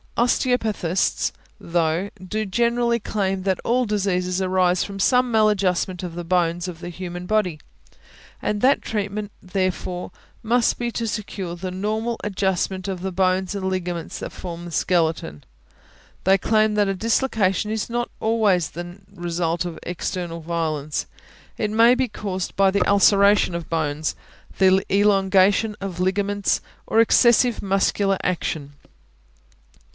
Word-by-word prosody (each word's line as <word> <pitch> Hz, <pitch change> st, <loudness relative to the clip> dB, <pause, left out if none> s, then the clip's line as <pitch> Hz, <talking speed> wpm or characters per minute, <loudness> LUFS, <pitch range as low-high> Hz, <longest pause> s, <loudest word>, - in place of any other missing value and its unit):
Osteopathists, 225 Hz, -7 st, +1 dB, 0.3 s
though, 170 Hz, +2 st, 0 dB
do 215 Hz, +4 st, -2 dB
generally 235 Hz, +3 st, +1 dB
claim 195 Hz, -3 st, -1 dB
that 190 Hz, -1 st, 0 dB
all 250 Hz, +2 st, +2 dB
diseases 190 Hz, -3 st, 0 dB
arise 185 Hz, -1 st, +2 dB
from 200 Hz, -1 st, -7 dB
some 250 Hz, +4 st, +3 dB
maladjustment 195 Hz, -4 st, +1 dB
of 175 Hz, -2 st, -5 dB
the 175 Hz, -, -4 dB
bones 175 Hz, 0 st, 0 dB
of 175 Hz, -2 st, -7 dB
the 175 Hz, 0 st, -6 dB
human 175 Hz, 0 st, -6 dB
body, 185 Hz, -6 st, 0 dB, 0.8 s
and 205 Hz, -1 st, -1 dB
that 270 Hz, +2 st, +4 dB
treatment, 210 Hz, -1 st, -3 dB
therefore, 185 Hz, -1 st, -3 dB, 0.3 s
must 235 Hz, +2 st, +2 dB
be 240 Hz, -1 st, -2 dB
to 230 Hz, 0 st, -3 dB
secure 195 Hz, -5 st, -4 dB
the 185 Hz, +1 st, -5 dB
normal 215 Hz, +5 st, -2 dB
adjustment 190 Hz, -1 st, -1 dB
of 190 Hz, -2 st, -4 dB
the 190 Hz, 0 st, -3 dB
bones 185 Hz, +1 st, +1 dB
and 190 Hz, -1 st, -2 dB
ligaments 180 Hz, -3 st, -3 dB
that -, -, -6 dB
form 170 Hz, -1 st, -7 dB
the 175 Hz, -, -8 dB
skeleton. 160 Hz, -, 0 dB, 0.8 s
They 190 Hz, +1 st, +5 dB
claim 215 Hz, +2 st, +2 dB
that 205 Hz, -1 st, +3 dB
a 195 Hz, -, 0 dB
dislocation 215 Hz, -2 st, +1 dB
is 220 Hz, +1 st, -2 dB
not 240 Hz, 0 st, -2 dB
always 210 Hz, -8 st, +1 dB
necessarily 175 Hz, +3 st, -7 dB
the 185 Hz, -, -14 dB
result 170 Hz, 0 st, -1 dB
of 175 Hz, -2 st, -6 dB
external 175 Hz, -1 st, -4 dB
violence; 155 Hz, -3 st, -2 dB, 0.5 s
it 210 Hz, -, -1 dB
may 230 Hz, +3 st, +6 dB
be 260 Hz, 0 st, 0 dB
caused 190 Hz, -4 st, -4 dB
by 195 Hz, 0 st, +4 dB
the 200 Hz, -, +1 dB
ulceration 200 Hz, -1 st, +4 dB
of 170 Hz, -1 st, -5 dB
bones, 155 Hz, -2 st, -1 dB, 0.4 s
the 190 Hz, 0 st, +4 dB
elongation 200 Hz, +1 st, +3 dB
of 190 Hz, -3 st, -5 dB
ligaments, 200 Hz, +2 st, 0 dB, 0.3 s
or 225 Hz, -, +2 dB
excessive 240 Hz, +1 st, +4 dB
muscular 195 Hz, 0 st, +1 dB
action. 155 Hz, -5 st, -2 dB
190 Hz, 140 wpm, -22 LUFS, 180-210 Hz, 0.8 s, may